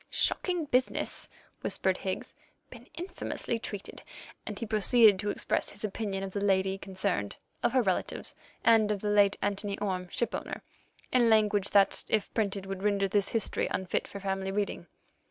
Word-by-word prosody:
"Shocking 355 -4 0
business," 255 -2 0 0.3
whispered - - 0
Higgs; - - -4 0.4
"been - - -12
infamously 345 -9 -3
treated," 205 -3 -6 0.5
and - - -4
he 230 - -3
proceeded 215 -1 +5
to 205 +1 -1
express - - -1
his 205 - -8
opinion 200 -2 -2
of 195 - -4
the 200 - -2
lady 190 -1 +2
concerned, 185 - -2 0.3
of 235 - +1
her 255 -2 +4
relatives, 190 -3 -1 0.3
and 225 -2 +5
of 205 -2 -1
the 210 - 0
late 205 -1 +4
Anthony 200 0 -1
Orme, 185 -3 -2
shipowner, 240 - -3 0.5
in 240 -2 +4
language 210 -2 +3
that, 200 -1 +4
if 215 -2 0
printed, 200 -3 -1
would 195 -1 -5
render 200 -1 +2
this 200 0 +1
history 225 -3 0
unfit 190 -1 -1
for 200 - -8
family 195 0 -2
reading. 195 -3 -2
205 Hz, 160 wpm, -30 LUFS, 195-220 Hz, 0.5 s, proceeded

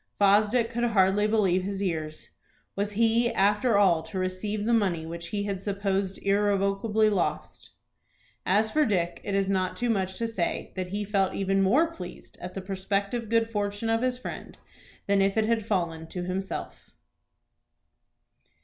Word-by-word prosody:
Fosdick 210 +4 +3
could 235 +1 -2
hardly 205 -2 +3
believe 195 -4 +2
his 195 +1 -4
ears. 160 -5 -4 0.4
Was 205 +1 -2
he 230 +2 +2
after 205 +3 +2
all 180 -5 +4
to 160 +4 -8
receive 185 +3 -2
the 235 - +2
money 185 -8 +1
which 170 +1 -6
he 200 +3 -2
had 200 -2 -3
supposed 195 -1 -1
irrevocably 205 +2 +2
lost? 200 -4 -2 0.7
As 215 +3 +2
for 310 - +3
Dick 180 -9 -1
it 200 - -2
is 195 -1 +1
not 185 -1 0
too 240 +2 0
much 190 -3 -1
to 230 - -1
say 195 -7 -3
that 185 -1 -3
he 205 +3 -3
felt 195 -2 0
even 195 0 +1
more 280 - +3
pleased 180 -1 -10
at 180 +1 -7
the 195 - -4
prospective 200 +4 -2
good 230 0 +2
fortune 205 +1 -2
of 225 0 +1
his 255 0 0
friend 255 - -8 0.5
than 200 0 +2
if 195 +2 +1
it 220 - +3
had 225 -1 0
fallen 170 -5 -1
to 180 +2 -5
himself. 185 +2 -5
200 Hz, 165 wpm, -27 LUFS, 185-220 Hz, 0.7 s, all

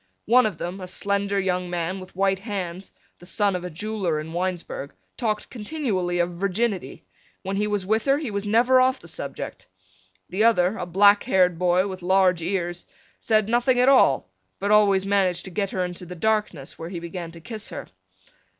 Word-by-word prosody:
One 250 +1 +5
of 195 -7 -5
them, 180 +3 -5
a 185 - -6
slender 200 +1 -1
young 180 -2 -1
man 175 +2 -2
with 185 -1 -12
white 195 0 +1
hands, 190 -3 -5 0.3
the 175 - -13
son 200 0 +1
of 180 - -4
a 180 - -4
jeweler 185 -2 -2
in 160 +2 -7
Winesburg, 175 -5 -3 0.2
talked 215 -3 -2
continually 210 - -2
of 175 0 +1
virginity. 195 +3 -2 0.4
When 195 +1 -3
he 210 +1 0
was 205 -3 -1
with 220 +3 +1
her 275 0 +3
he 290 -7 -4
was 200 0 -2
never 240 +5 +4
off 260 +1 +3
the - - -13
subject. - - -6 0.6
The 190 +5 0
other, 200 -4 +4
a 180 - -5
black 200 +3 +5
haired 180 -7 +3
boy 180 +1 +3
with 185 -1 -7
large 185 -1 +3
ears, 175 0 -3 0.3
said 215 -2 +2
nothing 245 +2 +2
at 250 +2 +5
all 255 - +4 0.3
but 200 +1 -1
always 200 -2 +4
managed 195 -3 +1
to 190 - -7
get 200 +2 -1
her 185 -1 -1
into 180 0 -7
the 180 - -7
darkness, 210 -7 -1
where 165 - -6
he 175 -2 -5
began 170 0 -6
to 165 - -11
kiss 215 +5 -6
her. - - -6
190 Hz, 195 wpm, -24 LUFS, 180-210 Hz, 0.6 s, One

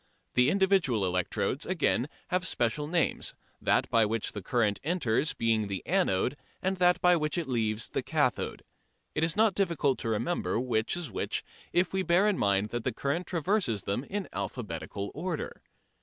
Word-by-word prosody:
The 125 +2 +4
individual 190 - +3
electrodes, 90 -1 -1
again, - - +1 0.2
have 180 0 +1
special 125 +4 0
names, 170 +1 0 0.3
that - - +2
by 115 -1 +5
which 110 +1 -1
the 105 - -6
current 105 0 +1
enters 150 -4 +1
being 110 -2 +1
the 100 -2 -4
anode 145 - +1 0.2
and 190 +1 -1
that 180 0 +4
by 180 0 +6
which 155 0 -1
it 170 -4 -1
leaves 110 -3 0
the - - -1
cathode. - - 0 0.5
It 155 - 0
is 165 0 +1
not 215 -1 +4
difficult 170 -8 +1
to 115 - -2
remember 115 +4 0
which 120 +3 0
is 175 -4 -5
which - - -2 0.3
if 175 +2 +2
we 190 - +1
bear 185 +3 +3
in 205 -3 +1
mind 100 +1 +2
that 120 0 -3
the 130 - 0
current 140 +9 -2
traverses 170 - 0
them 100 +6 -2
in 200 +3 -4
alphabetical 100 - -4
order. 165 +1 -4
140 Hz, 170 wpm, -29 LUFS, 110-180 Hz, 0.5 s, by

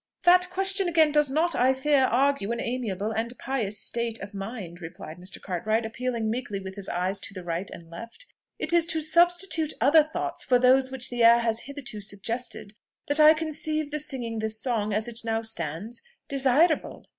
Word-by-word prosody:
"That 360 +1 +5
question 385 +1 0
again, 320 -3 +4
does 295 -1 +3
not, 320 +5 +1
I 260 +2 +3
fear, 270 0 +3
argue 260 -3 +1
an 235 - -2
amiable 220 -5 -3
and 230 +2 -3
pious 230 -6 -2
state 235 -1 -3
of 200 +1 -9
mind," 195 -4 -7
replied 165 0 -9
Mr. 185 +2 -9
Cartwright, 215 +5 -1
appealing 235 0 -3
meekly 230 -4 -3
with 190 0 -8
his 200 -1 -6
eyes 185 +3 -1
to 200 - -7
the 185 - -7
right 175 +2 -3
and 170 - -11
left. 230 - -10 0.3
"It 310 - -2
is 340 -1 +4
to 320 -2 0
substitute 340 0 +2
other 290 +7 +6
thoughts 310 +1 -3
for 250 - +3
those 260 +1 +4
which 260 -1 -1
the 240 -1 0
air 235 +1 +7
has 225 -1 0
hitherto 275 -7 -7
suggested 215 +1 -4 0.4
that 290 +2 +2
I 305 +1 +8
conceive 310 -1 -1
the 300 - -2
singing 245 -6 -2
this 220 0 -2
song, 220 -4 -1
as 215 +3 0
it 235 -1 -4
now 225 0 -1
stands, 205 +1 -4 0.3
desirable." 275 +4 +1
240 Hz, 190 wpm, -26 LUFS, 215-300 Hz, 0.4 s, I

